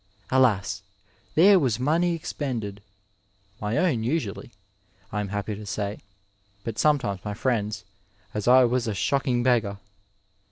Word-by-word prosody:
Alas! 110 -6 +2 0.5
there 190 +4 +7
was 125 -7 0
money 165 +6 +2
expended 115 -10 -4 0.8
(my 105 +2 -1
own 135 -12 +2
usually, 120 -4 -2 0.6
I 105 - -2
am 100 - -3
happy 100 +2 -3
to 105 +1 -8
say, 100 +1 -3 0.6
but 115 -1 -5
sometimes 130 -11 +1
my 105 -1 -4
friends', 110 -3 -1 0.5
as 105 0 -3
I 130 +1 +7
was 125 0 0
a 110 - -1
shock 140 +8 0
ing 120 -2 +2
beggar 115 -6 +2
115 Hz, 135 wpm, -25 LUFS, 105-130 Hz, 0.8 s, there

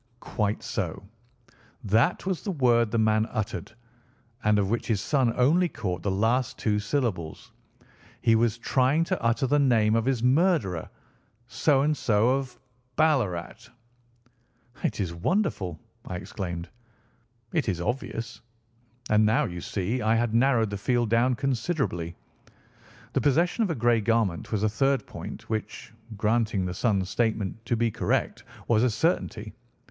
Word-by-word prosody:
"Quite 105 -3 -2
so. - - -3 0.8
That 115 - +2
was 190 -3 -1
the 210 - -5
word 120 - +3
the 115 - -1
man 110 0 +2
uttered, 110 0 -4 0.7
and 105 0 +3
of 100 -2 +1
which 115 - -1
his 110 -4 +1
son 130 +1 +1
only 165 +8 +3
caught 90 - -4
the 100 - -1
last 115 +6 +1
two 105 -2 0
syllables. 105 - -3 0.7
He 115 - +4
was 115 0 +2
trying 130 +6 +2
to - - -2
utter 115 +4 +1
the 145 +3 +2
name 115 -6 +3
of 115 0 +1
his 130 -3 0
murderer. 130 - +2 0.6
So 135 +3 +2
and 150 +1 +2
so, 115 -3 +2
of 130 -3 -5 0.4
Ballarat." 120 - 0 1.1
"It - - -1
is 90 -4 -2
wonderful!" 95 - -1 0.3
I 90 - -4
exclaimed. 90 -3 -5 0.9
"It - - +1
is 90 -3 -1
obvious. 115 +3 -4 0.7
And 105 0 +5
now, 110 +2 +3
you 85 -1 -6
see, 105 +8 -2
I 110 0 +2
had 115 -1 0
narrowed 115 -3 +3
the 100 - -4
field 120 0 0
down 120 +2 +3
considerably. 125 - -2 1.0
The - - +1
possession 170 - +2
of 205 - 0
a 165 - -1
grey 120 -2 +2
garment 105 - 0
was 105 -1 0
a - - +4
third 135 +6 +1
point - - -9
which, 110 0 -5 0.2
granting 110 -2 +1
the 90 - -3
son's 100 -2 0
statement 110 -2 -1
to 120 - +1
be 115 0 +1
correct, - - -1 0.2
was 110 -2 +3
a 125 - +3
certainty. 110 - -1
115 Hz, 150 wpm, -26 LUFS, 105-130 Hz, 1.1 s, And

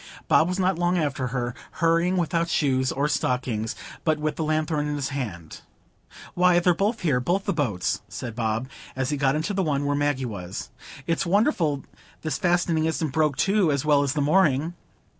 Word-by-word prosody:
Bob 160 - +4
was 180 +1 -2
not 185 -2 +1
long 175 +1 +2
after 140 -5 -1
her, 120 -1 -2 0.2
hurrying 170 +2 +2
without 170 -1 0
shoes 130 -4 +1
or 140 +2 0
stockings, 125 -6 -1 0.3
but 155 -1 +2
with 150 0 -2
the 160 - -2
lanthorn 155 -1 0
in 150 - -2
his 140 -2 -2
hand. 100 - -6 0.7
"Why, 180 0 +4
they're 175 0 +3
both 205 +6 -1
here,—both 170 +5 +1
the 200 - 0
boats," 115 - -1
said 120 -4 -6
Bob, 115 +1 -1 0.3
as 130 +1 -1
he - - +1
got 135 0 +2
into 160 +7 -1
the 195 - 0
one 145 -5 0
where 145 0 +1
Maggie 145 -2 0
was. 95 -5 -6 0.3
"It's 165 -1 0
wonderful 175 - +2 0.4
this 155 - -2
fastening 175 -2 +2
isn't 160 -1 -1
broke 150 -1 +1
too, 195 -5 +3
as 140 0 -1
well 145 -2 +4
as 140 -1 0
the 150 - 0
mooring." 155 0 +2
150 Hz, 185 wpm, -25 LUFS, 130-175 Hz, 0.7 s, Bob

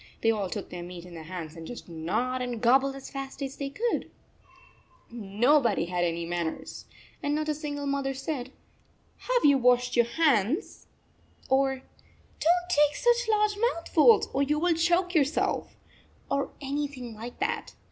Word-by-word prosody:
They 225 - +4
all 205 -4 -2
took 205 0 -6
their 175 - -6
meat 175 0 -8
in 180 - -12
their 160 -2 -9
hands 165 -2 -7
and 165 -1 -9
just 245 - -8
gnawed 185 +11 -2
and 245 -2 -3
gobbled 270 +4 +3
as 275 - -9
fast 275 -1 -6
as 270 0 -5
they 280 -1 -3
could! 455 +11 -2 1.0
Nobody 235 - +2
had 175 0 -1
any 170 0 -1
manners, 170 -1 -4 0.4
and 290 0 0
not 310 0 -1
a - - +2
single 290 -1 -5
mother 275 -1 -1
said, 265 -2 -4 0.4
" - - -37
Have - - +3
you 285 -2 +6
washed 245 0 +3
your 235 -1 +4
hands?" 285 - +1 0.6
or 265 0 +3 0.4
" - - -32
Don 345 +3 +3
t - - +2
take 295 0 +4
such 480 -1 +2
large 425 -1 +2
mouthfuls 420 -1 +4
or 275 - +1
you 295 +2 +1
will 345 +2 +2
choke 350 +2 +2
yourself," 305 -2 +1 0.6
or 280 0 0
anything 275 -4 -4
like 230 +3 -8
that. 415 +5 -2
270 Hz, 170 wpm, -28 LUFS, 220-305 Hz, 1.0 s, you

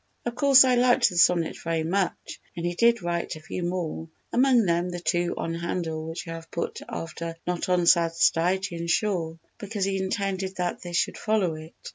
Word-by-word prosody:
Of 240 - -2
course 275 0 +7
I 255 -1 +3
liked 245 0 +4
the 180 - -6
sonnet 170 -2 +3
very 165 -1 -1
much 185 +3 -2 0.2
and 170 - -3
he 175 - -1
did 235 +2 +3
write 170 -1 -2
"a - - -9
few 155 +3 -6
more"—among 180 - 0
them 175 0 +1
the 175 0 -5
two 175 +1 0
on 165 - -3
Handel 165 -2 -3
which 165 +1 -6
I - - -5
have 165 0 -9
put 170 - -4
after 165 0 -5
"Not 180 0 -2
on 180 -1 +2
sad 170 -1 +4
Stygian 170 0 +1
shore" 170 -3 0 0.2
because 205 -1 -3
he 195 0 -1
intended 190 -1 -2
that 180 -1 -2
they 175 -1 -8
should 175 - 0
follow 210 -6 +1
it. 155 +1 -10
175 Hz, 190 wpm, -26 LUFS, 165-195 Hz, 0.2 s, course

